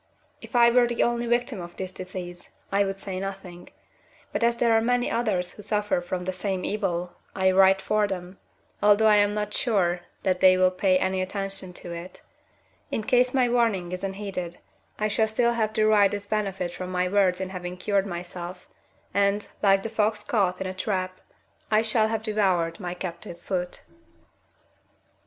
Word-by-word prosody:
If - - -10
I 235 0 +6
were 245 0 +5
the 240 0 +1
only 240 0 0
victim 240 -3 0
of 175 0 -9
this 190 -1 -5
disease, 185 -1 -8 0.2
I 200 +1 +3
would 195 0 -3
say 195 -1 -5
nothing, 190 -2 -7 0.6
but - - -1
as 235 0 +3
there 235 -1 +3
are 225 - +4
many 245 +1 +1
others 200 -7 0
who - - -11
suffer 210 -3 0
from 180 +1 -4
the 185 - -2
same 185 0 -2
evil, 180 -4 -2 0.2
I 190 -1 +3
write 190 0 +5
for 215 -1 +2
them, 185 -1 -6 0.4
although 205 +1 +5
I 210 -1 +6
am 205 0 +3
not 210 0 -3
sure 185 -7 +1 0.2
that 185 -2 +1
they 185 0 +6
will 185 0 +4
pay 185 0 +2
any 190 0 0
attention 195 -1 -4
to 175 -1 -7
it; 170 +2 -9 0.7
in 220 - -2
case 250 +2 +3
my 255 -2 +3
warning 225 -7 +1
is 180 +1 -5
unheeded, 190 -3 -4 0.4
I 215 - 0
shall 220 +1 +1
still 235 +2 +1
have 220 -2 0
derived 215 -2 +4
this 205 0 -4
benefit 195 -4 -2
from 185 +1 -6
my 180 0 +1
words 185 -2 +2
in 190 -1 -3
having 180 -1 -6
cured 200 +1 0
myself, 175 0 -7 0.5
and, 200 +1 +1
like 195 -1 +4
the 225 - -3
fox 215 -1 0
caught 190 -5 0
in 190 - -3
a 185 - -3
trap, 185 -1 -3 0.5
I 215 0 +3
shall 220 -1 +3
have 220 0 -2
devoured 190 -5 +1
my 180 -2 -4
captive 175 -1 -7
foot. 180 0 -4
195 Hz, 185 wpm, -26 LUFS, 185-215 Hz, 0.7 s, I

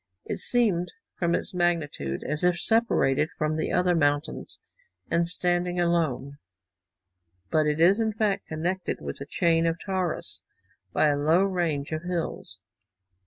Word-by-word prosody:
It - - -4
seemed, 205 -8 +1 0.3
from 170 -1 +2
its - - -4
magnitude, 160 - -1
as 150 +2 -3
if 180 -1 +3
separated 175 - +2
from 155 0 0
the 160 - -1
other 180 0 +3
mountains, 145 -2 0 0.5
and 170 0 +2
standing 175 0 0
alone; 155 -5 0 1.1
but 155 -1 +3
it 150 +1 0
is 185 +6 +5
in 220 -1 +1
fact, 210 -2 -1
connected 175 +3 -2
with - - -6
the 140 - -7
chain 165 +1 +2
of 165 0 0
Taurus 185 -3 -3 0.5
by 155 - +3
a 145 - +2
low 160 +6 +4
range 170 -7 -1
of 155 0 -2
hills. 170 - -4
170 Hz, 145 wpm, -26 LUFS, 155-180 Hz, 1.1 s, is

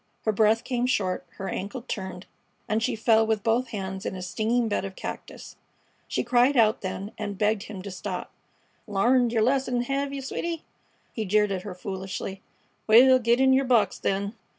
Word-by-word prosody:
Her 220 - +3
breath 215 +2 +3
came 245 -1 -1
short, 185 -7 -1
her 195 - -5
ankle 205 +8 -4
turned, 190 -6 -5 0.4
and 215 +1 0
she 225 - 0
fell 225 0 +4
with 220 -2 0
both 235 +3 +1
hands 190 -4 -5
in - - -3
a 185 - -6
stinging 225 +6 0
bed 205 - -1
of 195 -1 -6
cactus. - - -8 0.5
She - - -1
cried 250 +3 +3
out 220 -2 +4
then 195 +2 -5
and 205 -2 -4
begged 210 0 +1
him 195 -3 -7
to 200 - -6
stop. 185 - -5 0.6
"L'arned 235 +4 +3
yer 225 -2 +1
lesson, 250 -1 +1
hev 275 +2 -2
yeh, 280 -1 -4
sweety?" 330 +5 -4 0.5
he 220 - -2
jeered 210 +1 +2
at 190 -2 -2
her, 190 -2 -7
foolishly. 190 0 -5 0.5
"Well, 255 +4 +7
get 235 +1 +2
in 265 0 +5
yer 265 +1 +4
box, 235 -6 +2
then." 200 +2 -1
220 Hz, 185 wpm, -26 LUFS, 195-245 Hz, 0.6 s, Well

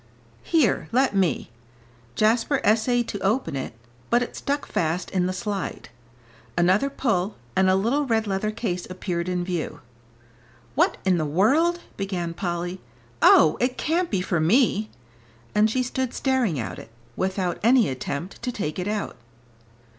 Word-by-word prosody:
"Here 315 -8 +2
let 255 -2 +2
me." 175 -11 +1 0.6
Jasper 230 +5 +2
essayed 230 +3 +2
to 205 - -4
open 195 - 0
it, 130 -3 -4 0.4
but 240 +1 +3
it - - -7
stuck 285 +1 -2
fast 170 +2 -1
in 180 -2 +1
the - - -1
slide. 190 - -4 0.7
Another 185 +10 +3
pull, 215 -8 -1 0.2
and 190 0 +4
a 185 - +4
little 250 +9 +1
red 225 -2 +1
leather 200 +1 -1
case 200 -6 -3
appeared 180 -1 -3
in 180 -1 -1
view. 175 -4 -3 0.9
"What - - +2
in 185 -2 +3
the - - 0
world 285 - +2
" - - -30
began 185 -4 -3
Polly; 175 +1 -3 0.4
"oh, 155 - +6
it 250 +1 0
can't 340 +3 0
be 195 -4 0
for 180 -2 0
me!" 215 - +3 0.6
and 210 +1 +4
she 255 +3 0
stood 255 0 -3
staring 255 - +1
at 115 - -5
it, - - -12 0.3
without 185 -2 -1
any 235 0 +5
attempt 140 +7 -5
to 250 - -2
take 185 -8 -4
it 180 - -2
out. 210 -1 -3
200 Hz, 155 wpm, -24 LUFS, 180-245 Hz, 0.9 s, oh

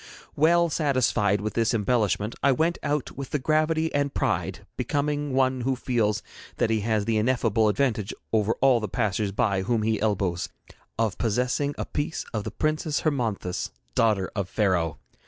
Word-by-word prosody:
Well 170 +3 +4
satisfied 125 - +2
with 105 +1 -3
this 115 0 +1
embellishment, 110 -1 +1
I 140 -1 +4
went 165 +6 0
out 145 -2 -1
with 135 -1 -6
the - - 0
gravity 155 +3 +1
and 145 0 +1
pride - - -1
becoming 145 0 -1
one 130 -1 +2
who 130 +2 0
feels 115 -5 0 0.3
that 115 - +1
he 110 - +2
has 110 -1 0
the 115 0 +1
ineffable 115 -2 +2
advantage 110 -2 0 0.2
over 110 0 +3
all 130 -3 +5
the 110 - -3
passers 105 0 0
by 100 -3 +1
whom 110 +3 0
he 110 0 0
elbows, 95 -5 0 0.5
of 115 -3 0
possessing 125 +5 0
a - - -3
piece 145 +2 -3
of 110 -2 -2
the - - -2
Princess 155 +5 -1
Hermonthis, 115 - -1 0.2
daughter 105 - +2
of 100 -3 -2
Pharaoh. 90 -7 +1
115 Hz, 165 wpm, -26 LUFS, 105-140 Hz, 0.5 s, all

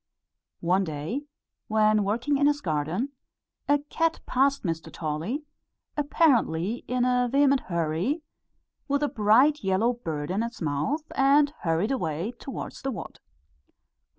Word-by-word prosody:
One 185 +3 +2
day, 170 - -4 0.4
when 215 -1 +3
working 240 +8 0
in 285 - +4
his 290 0 +2
garden, 160 - -1 0.6
a 290 - +6
cat 330 0 +1
passed 275 +2 +2
Mr. 165 -3 -3
Tolly, 165 - -3 0.5
apparently 245 - +2
in 250 0 +1
a 250 -1 +2
vehement 275 -1 +4
hurry, 170 - -1 0.6
with 285 0 +1
a - - +3
bright 250 +6 +4
yellow 195 +6 +2
bird 160 -9 -4
in 195 +4 0
its 235 0 -4
mouth, 155 - -1
and 285 +2 +4
hurried 165 +8 0
away 175 - -2
towards 270 - -7
the 270 - -2
wood. 255 - -7
230 Hz, 130 wpm, -27 LUFS, 170-280 Hz, 0.6 s, a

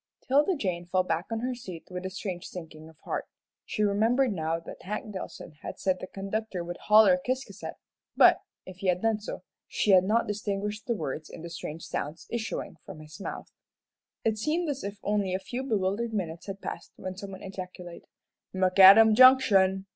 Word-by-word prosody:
'Tilda 295 +8 +3
Jane 180 - -2
fell 185 +1 +2
back 170 0 -2
on 225 -1 -2
her 255 +1 -1
seat 190 -9 -9
with 180 +1 -4
a - - -5
strange 185 -2 -5
sinking 160 -3 -10
of 160 - -19
heart. - - -3 0.4
She 215 - -1
remembered 225 +5 +2
now 165 -1 -1
that 165 - -11
Hank 210 +3 -5
Dillson 170 -4 -8
had - - -7
said 185 -1 0
the - - -7
conductor 195 -1 -4
would 175 +1 -6
"holler" 220 +6 +6
Ciscasset; 260 0 -4 0.4
but, - - +7 0.2
if 185 -1 -10
he 190 - -4
had 180 +1 +1
done 225 -1 +2
so, 210 - -7 0.2
she 210 - +1
had 185 -1 +7
not 220 +5 +2
distinguished 210 0 -3
the 235 - +1
words 155 -3 -5
in 165 - -10
the 170 - -7
strange 165 -1 -6
sounds 150 +3 -5
issuing 230 -1 -4
from 190 -5 -10
his 155 0 -12
mouth. - - -7 0.7
It 220 -1 +1
seemed 320 +8 0
as 280 -2 -3
if 200 +1 -5
only 200 -3 0
a - - -1
few 240 +6 -5
bewildered 220 -1 -1
minutes 170 -3 -4
had 195 0 -6
passed - - -7
when 185 0 -6
someone 195 0 -8
ejaculated, 180 -2 -8 0.5
"McAdam 195 +4 +8
Junction!" 205 -7 +6
195 Hz, 185 wpm, -28 LUFS, 180-220 Hz, 0.7 s, McAdam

